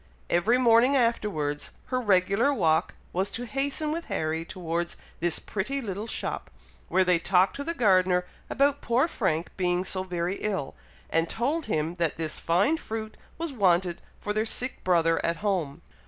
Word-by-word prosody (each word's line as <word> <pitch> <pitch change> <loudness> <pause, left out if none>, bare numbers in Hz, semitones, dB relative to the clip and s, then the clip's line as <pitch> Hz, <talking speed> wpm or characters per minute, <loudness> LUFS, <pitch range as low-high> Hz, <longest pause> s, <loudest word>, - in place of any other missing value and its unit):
Every 210 +9 +3
morning 245 +2 +5
afterwards, 205 - 0 0.2
her 255 - +2
regular 200 +4 +3
walk 165 - +1 0.2
was 190 +3 +1
to 245 - -4
hasten 280 +4 -1
with 335 +2 -3
Harry 160 +1 -2
towards 170 0 -3 0.2
this 170 -1 +2
pretty 220 +8 -3
little 210 -3 -4
shop, - - -2 0.4
where 190 - +4
they 180 -2 +3
talked 185 +2 +3
to 285 - -3
the 335 +3 -3
gardener 185 - +3 0.2
about 280 +1 +2
poor 245 +6 +2
Frank 170 - -1
being 180 0 +1
so 185 - -1
very 180 0 -2
ill, 195 -10 -2 0.4
and 165 +1 +2
told 285 +7 -1
him 160 -4 -1
that 165 - +1
this 160 -2 -2
fine 195 - +2
fruit 220 -6 -6 0.2
was 330 -3 -4
wanted 180 -5 +2 0.2
for 210 - -3
their 215 +1 +1
sick 250 +3 -2
brother 165 -2 +2
at 170 0 0
home. 175 -9 -1
190 Hz, 165 wpm, -27 LUFS, 170-240 Hz, 0.4 s, morning